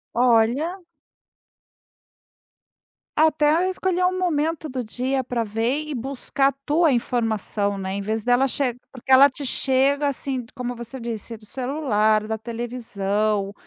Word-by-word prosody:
Olha. 245 +9 +2 2.4
Até 305 -1 +4
a 345 +5 +2
escolher 370 -1 -1
um 370 0 +1
momento 320 -2 0
do 255 -3 -4
dia 255 +4 -2
para 245 -1 -2
ver 235 +8 -1
e 300 - -4
buscar 270 +2 0
a - - +2
tua 315 +1 +3
informação, 220 -4 -1
né, 190 0 -4
em 200 - -3
vez 215 +2 -2
dela 245 +2 +4
che 265 -2 -1 0.2
porque 255 0 -13
ela 265 +2 +8
te 280 +2 -6
chega 275 +3 +2
assim, 270 -1 -3
t 235 - -16
como 245 -1 -4
você 240 +3 -8
disse, 230 -1 -5
do 215 - -17
celular, 220 -5 0
da 220 0 -2
televisão, 215 -3 -2
250 Hz, 145 wpm, -23 LUFS, 225-285 Hz, 2.4 s, ela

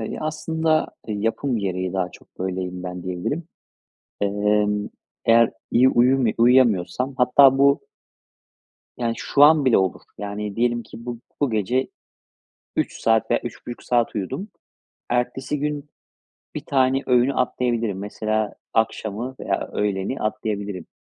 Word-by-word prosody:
Eee, 110 - -3
ya - - -6
aslında 160 0 0 0.2
yapım 115 +4 -1
gereği 95 -2 -2
daha 95 -2 -1
çok - - -19
böyleyim 90 -1 -3
ben 90 -1 -6
diyebilirim. 95 - -3 0.8
Emm, 105 0 +1 0.4
eğer 115 0 +5 0.2
iyi 125 +2 +5
uyumu 125 0 +3
uyuyamıyorsam 125 0 +3
hatta 135 +2 +6
bu 140 +1 +4 1.2
yani 115 -2 0
şu 140 - +1
an 150 0 +7
bile 130 -6 +5
olur. 95 -1 0 0.2
Yani 105 0 -5
diyelim 120 0 +1
ki 115 +1 -12
bu 120 -1 -4 0.2
bu 140 - +2
gece 115 +5 0 0.9
3 - - -1
saat 115 0 +2
veya 120 - +3
3.5 120 0 -7
saat 120 -2 +1
uyudum. 130 - -4 0.6
Ertesi 125 +4 -1
gün 150 0 -3 0.7
1 - - -5
tane 135 0 +2
öğünü 125 +2 +3
atlayabilirim. 120 -5 0
Mesela 110 +1 -2 0.2
akşamı 110 +3 -1
veya - - -2
öğleni 100 +4 -1
atlayabilirim. 105 -4 -3
115 Hz, 130 wpm, -23 LUFS, 105-130 Hz, 1.2 s, an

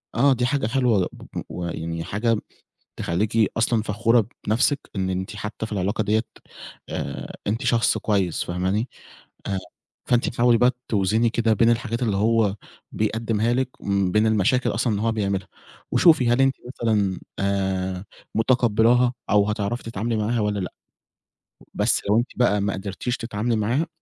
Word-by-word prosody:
آه 135 +4 +5
دي 125 0 0
حاجة 135 -4 0
حلوة 120 -7 +2
ب - - -13
ب - - -1
ويعني 85 -1 -4
حاجة 110 +4 0 0.6
تخلّيكِ 105 +5 +1
أصلًا 115 -1 +2
فخورة 115 +1 +2 0.2
بنَفْسك 135 +6 +2 0.2
إن 95 -1 -1
أنتِ 95 +3 -4
حتى 105 +1 -5
في 110 - -10
العلاقة 100 +2 0
ديّة 110 +2 +2 0.7
آآ، - - -5
أنتِ 110 +3 -1
شخص 120 -1 +3
كويس، 95 -5 0
فاهماني؟ 95 +7 -1 0.6
آآ، 95 -1 -1 0.5
فأنتِ 120 0 +3
تحاولي 120 -1 +3
بقى 125 +2 +4 0.2
توْزني 110 +3 +2
كده 115 -1 +2
بين 115 +2 +4
الحاجات 115 +1 0
اللي 105 -4 0
هو 110 -1 +2 0.4
بيقدّمها 110 +1 0
لِك 130 +1 0
وبين 100 +2 +2
المشاكل 110 +4 +2
أصلًا 120 0 0
اللي 100 - -1
هو 115 - +2
بيعملها، 100 -3 -1 0.4
وشوفي 155 -9 +5
هل 120 +3 +3
أنتِ 135 0 +3
مثلًا 105 -7 0 0.2
آآ، 95 -1 -1 0.3
متقبّلاها 120 +1 +3 0.2
أو 105 0 +4
هتعرفي 105 +3 -2
تتعاملي 115 +1 -2
معاها 115 +3 0
والّا 105 -1 0
لأ؟ 90 - -4 1.0
بس - - +1
لو 105 - +4
أنتِ 120 - -1
بقى 105 -5 +2
ما 100 -1 0
قدرتيش 100 +5 -3
تتعاملي 115 +1 -2
معاها، 120 +10 0
110 Hz, 150 wpm, -23 LUFS, 100-120 Hz, 1.0 s, آه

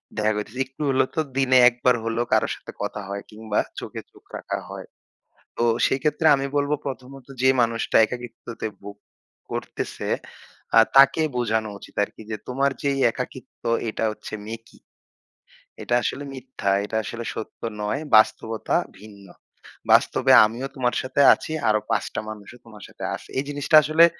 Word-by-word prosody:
দেখা 110 0 +1
হইতেসে। 105 +5 -6
একটু 130 +3 -14
হইলেও 130 -1 +2
তো 160 - +2 0.2
দিনে 130 -1 +4
একবার 125 0 +1
হলেও 115 +1 -1
কারো - - +3
সাথে - - -11
কথা 105 0 -3
হয় 100 0 -4
কিংবা 110 0 -2 0.2
চোখে - - -7
চোখ - - -20
রাখা - - -4
হয়। - - -8 0.7
তো - - -1 0.2
সেইক্ষেত্রে 150 +4 0
আমি 135 0 -2
বলব 145 0 +1 0.2
প্রথমত 130 0 -7 0.2
যে 130 - +5
মানুষটা 115 -1 +1
একাকিত্বতে 120 -1 -7
ভোগ 100 0 -9 0.6
করতেসে - - -4 0.7
আ 115 - +10 0.2
তাকে 140 +3 +7
বোঝানো 110 -2 0
উচিত - - -14
আরকি 110 - -13
যে 110 - -2
তোমার 135 +2 +1
যেই 140 -1 0
একাকিত্ব - - -8 0.2
এটা 110 - -2
হচ্ছে 105 - -9
মেকি। 115 +1 -9 1.0
এটা 120 - -1
আসলে 145 +2 -3
মিথ্যা। 130 -6 -4
এটা 110 +1 -4
আসলে 115 +2 -6
সত্য 110 - -8 0.2
নয়। 105 +7 -1 0.2
বাস্তবতা 110 +1 +2 0.2
ভিন্ন। 100 -1 -14 0.7
বাস্তবে - - +4
আমিও 120 +5 -4
তোমার 125 -2 0
সাথে 130 +2 0
আছি। - - -6 0.2
আরো 110 - +3
৫ 110 -2 +1
টা - - -2
মানুষও 110 +2 -10
তোমার 105 -4 -13
সাথে - - -12
আছে। - - -13
এই 135 - -1
জিনিসটা 145 +2 +1
আসলে 160 +3 +6
120 Hz, 155 wpm, -23 LUFS, 110-135 Hz, 1.0 s, আ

